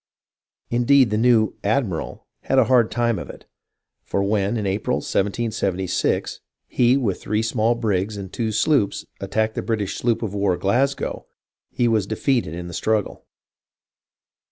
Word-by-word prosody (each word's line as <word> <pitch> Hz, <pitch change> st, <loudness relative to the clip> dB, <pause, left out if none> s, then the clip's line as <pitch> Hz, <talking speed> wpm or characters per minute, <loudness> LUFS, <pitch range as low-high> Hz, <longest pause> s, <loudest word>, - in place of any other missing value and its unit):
Indeed, 125 Hz, 0 st, +4 dB
the 105 Hz, -, +1 dB
new 115 Hz, -3 st, +3 dB
"ad 125 Hz, +6 st, +2 dB
miral" 85 Hz, -6 st, -5 dB, 0.2 s
had 135 Hz, -, +1 dB
a 130 Hz, -, +7 dB
hard 120 Hz, -1 st, +3 dB
time 120 Hz, -4 st, 0 dB
of -, -, -8 dB
it; -, -, -11 dB, 0.6 s
for 100 Hz, -, -2 dB
when, 100 Hz, +2 st, 0 dB
in 105 Hz, -, -2 dB
April, 100 Hz, +2 st, 0 dB
1776, 95 Hz, -3 st, -1 dB, 0.3 s
he, 125 Hz, +2 st, +3 dB
with 110 Hz, -9 st, -1 dB
three 105 Hz, +1 st, -1 dB
small 115 Hz, +1 st, +1 dB
brigs 105 Hz, -3 st, -1 dB
and 95 Hz, -2 st, -8 dB
two 115 Hz, -2 st, -1 dB
sloops, 110 Hz, 0 st, +1 dB
attacked 110 Hz, +3 st, -1 dB
the -, -, -3 dB
British 105 Hz, -1 st, -2 dB
sloop 120 Hz, -1 st, 0 dB
of 105 Hz, -3 st, -3 dB
war 100 Hz, -3 st, +1 dB
Glasgozv, 125 Hz, +10 st, 0 dB, 0.4 s
he 120 Hz, -, 0 dB
was 110 Hz, -4 st, +1 dB
defeated 110 Hz, -, 0 dB
in 85 Hz, 0 st, -6 dB
the 85 Hz, -, -8 dB
struggle. 110 Hz, +4 st, -1 dB
110 Hz, 155 wpm, -22 LUFS, 100-120 Hz, 0.6 s, a